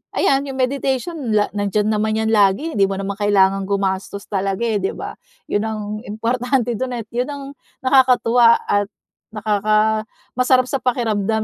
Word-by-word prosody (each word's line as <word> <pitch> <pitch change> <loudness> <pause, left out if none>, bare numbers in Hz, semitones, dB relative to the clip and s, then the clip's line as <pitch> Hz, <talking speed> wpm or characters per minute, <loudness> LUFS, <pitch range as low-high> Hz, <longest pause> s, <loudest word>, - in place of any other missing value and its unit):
ayan 275 +1 +2
yung 270 - -5
meditation 270 +4 -1 0.2
la 205 -1 +2
nandiyan 205 +1 0
naman 215 0 0
yan 220 0 0
lagi 205 +9 +3
hindi 200 -8 +2
mo 195 - -3
naman 195 +1 -4
kailangang 195 -1 +2
gumastos 200 0 -2
talaga 195 +1 -2
eh, 225 -3 0
'di 195 - -2
ba? - - -6 0.4
Yun 205 - +1
ang 220 -1 -4 0.3
importante 240 +3 -1
dun, 255 -1 -2
eh, 235 - -4
yun 245 +2 -1
ang 285 -1 -6 0.4
nakakatuwa 250 -3 +5
at 205 0 0 0.5
nakaka 215 +1 +1 0.2
masarap 255 +1 +3
sa 275 - 0
pakiramdam 220 -4 0
220 Hz, 155 wpm, -20 LUFS, 205-250 Hz, 0.5 s, nakakatuwa